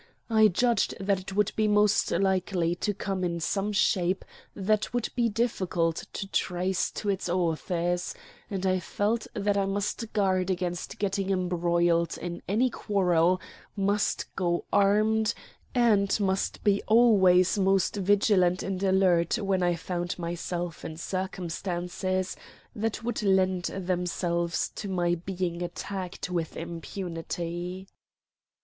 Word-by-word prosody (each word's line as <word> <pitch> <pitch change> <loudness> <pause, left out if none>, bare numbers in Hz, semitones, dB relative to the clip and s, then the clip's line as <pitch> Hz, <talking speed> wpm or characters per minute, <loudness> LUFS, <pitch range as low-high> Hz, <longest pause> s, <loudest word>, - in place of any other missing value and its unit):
I 220 -1 +6
judged 230 +3 +1
that 195 0 +1
it 190 +1 -8
would 210 0 +2
be 215 -1 +2
most 210 0 +3
likely 185 -3 +1
to 195 +4 -1
come 195 -2 -3
in 170 -1 -1
some 195 +5 -1
shape 185 -2 +1 0.3
that 215 +3 0
would 245 - 0
be 240 -2 +2
difficult 185 -7 0
to 200 - -4
trace 180 +1 0
to 210 - -3
its 190 -2 -1
authors; 175 0 -1 0.3
and 195 -2 -3
I 185 0 +2
felt 215 +5 -1
that 205 -1 +1
I 200 - +2
must 205 +3 -2
guard 190 -3 +1
against 180 -2 -3
getting 195 -1 -1
embroiled 175 -2 +1
in 175 -1 -5
any 235 +6 +2
quarrel, 185 -5 +2 0.4
must 200 +1 0
go 175 -2 0
armed, 215 +2 +3 0.4
and 215 -5 +3
must 195 -1 -1
be 200 -1 +3
always 200 -5 +5
most 195 0 +2
vigilant 195 -2 +3
and 195 -1 -3
alert 190 -1 +3
when 195 -4 0
I 175 -1 +2
found 175 +1 -3
myself 175 0 -4
in 160 - -6
circumstances 185 0 -3 0.4
that 225 +1 -2
would 240 0 -2
lend 190 -2 +2
themselves 175 -2 -1
to 205 - -4
my 175 -2 +1
being 175 0 -3
attacked 180 +1 -5
with 170 -3 -2
impunity. 175 +1 -5
185 Hz, 130 wpm, -28 LUFS, 175-200 Hz, 0.4 s, I